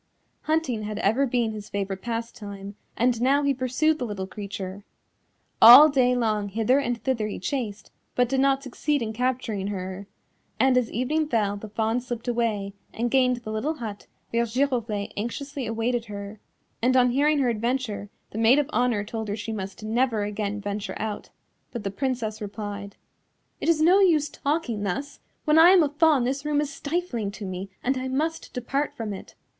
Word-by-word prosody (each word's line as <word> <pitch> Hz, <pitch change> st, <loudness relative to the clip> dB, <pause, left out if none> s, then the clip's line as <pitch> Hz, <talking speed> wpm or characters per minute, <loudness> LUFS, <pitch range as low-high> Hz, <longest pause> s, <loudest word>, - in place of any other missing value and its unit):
Hunting 310 Hz, -8 st, 0 dB
had 210 Hz, 0 st, -4 dB
ever 225 Hz, +7 st, +2 dB
been 235 Hz, -2 st, 0 dB
his 210 Hz, -1 st, -8 dB
favourite 195 Hz, -1 st, -3 dB
pastime, 210 Hz, -4 st, -6 dB, 0.2 s
and 240 Hz, -1 st, +2 dB
now 275 Hz, +3 st, +3 dB
he 280 Hz, 0 st, +2 dB
pursued 265 Hz, +5 st, +1 dB
the 250 Hz, -, -2 dB
little 200 Hz, -3 st, -4 dB
creature. 200 Hz, -1 st, -7 dB, 0.8 s
All 250 Hz, +7 st, +11 dB
day 255 Hz, -3 st, +3 dB
long 215 Hz, -4 st, 0 dB
hither 225 Hz, +6 st, +2 dB
and 245 Hz, -3 st, -2 dB
thither 240 Hz, -5 st, 0 dB
he 210 Hz, -, -5 dB
chased, 215 Hz, -1 st, -4 dB, 0.2 s
but 250 Hz, 0 st, +3 dB
did 265 Hz, +2 st, 0 dB
not 275 Hz, 0 st, +2 dB
succeed 285 Hz, +1 st, -1 dB
in 220 Hz, -1 st, -4 dB
capturing 240 Hz, -4 st, -1 dB
her, 190 Hz, 0 st, -5 dB, 0.5 s
and 265 Hz, -1 st, +4 dB
as 250 Hz, -2 st, +1 dB
evening 295 Hz, +7 st, 0 dB
fell 210 Hz, -6 st, +1 dB
the 210 Hz, +1 st, -8 dB
Fawn 225 Hz, +3 st, 0 dB
slipped 240 Hz, -1 st, -6 dB
away 220 Hz, -5 st, -1 dB, 0.2 s
and 235 Hz, +1 st, -2 dB
gained 250 Hz, -2 st, +2 dB
the 215 Hz, -, -5 dB
little 265 Hz, +9 st, -1 dB
hut 215 Hz, -7 st, -7 dB, 0.2 s
where 235 Hz, -, +2 dB
Giroflée 235 Hz, -4 st, -1 dB
anxiously 270 Hz, +5 st, -4 dB
awaited 230 Hz, +1 st, -1 dB
her, 205 Hz, 0 st, -8 dB, 0.4 s
and 255 Hz, +2 st, +3 dB
on 250 Hz, -1 st, +4 dB
hearing 295 Hz, +4 st, +3 dB
her 265 Hz, -3 st, +2 dB
adventure 230 Hz, -2 st, -2 dB, 0.2 s
the 220 Hz, -, -5 dB
Maid 230 Hz, +4 st, +5 dB
of 295 Hz, -2 st, +2 dB
Honour 245 Hz, -7 st, +1 dB
told 220 Hz, +1 st, -5 dB
her 205 Hz, -, -2 dB
she 215 Hz, +1 st, -5 dB
must 200 Hz, -1 st, -6 dB
never 225 Hz, 0 st, +1 dB
again 205 Hz, 0 st, -3 dB
venture 205 Hz, -1 st, -4 dB
out, 215 Hz, -1 st, -4 dB, 0.4 s
but 235 Hz, -4 st, -6 dB
the 195 Hz, -, -2 dB
Princess 230 Hz, -2 st, -2 dB
replied: 205 Hz, -1 st, -6 dB, 0.6 s
"It -, -, -1 dB
is 310 Hz, -2 st, +3 dB
no 365 Hz, +4 st, +6 dB
use 320 Hz, -6 st, +4 dB
talking 280 Hz, -7 st, -2 dB
thus, 205 Hz, +9 st, -3 dB, 0.3 s
when 305 Hz, +1 st, +5 dB
I 335 Hz, +2 st, +9 dB
am 370 Hz, -3 st, +7 dB
a 295 Hz, -, +1 dB
Fawn 295 Hz, -2 st, +3 dB
this 270 Hz, +3 st, -1 dB
room 295 Hz, -1 st, +1 dB
is 290 Hz, -1 st, -2 dB
stifling 285 Hz, -, -2 dB
to 210 Hz, -, -7 dB
me 185 Hz, +1 st, -5 dB
and 260 Hz, +1 st, +1 dB
I 260 Hz, -, -3 dB
must 310 Hz, +5 st, -2 dB
depart 275 Hz, +4 st, -2 dB
from 220 Hz, -3 st, -3 dB
it." 190 Hz, -, -10 dB
235 Hz, 185 wpm, -25 LUFS, 210-270 Hz, 0.8 s, All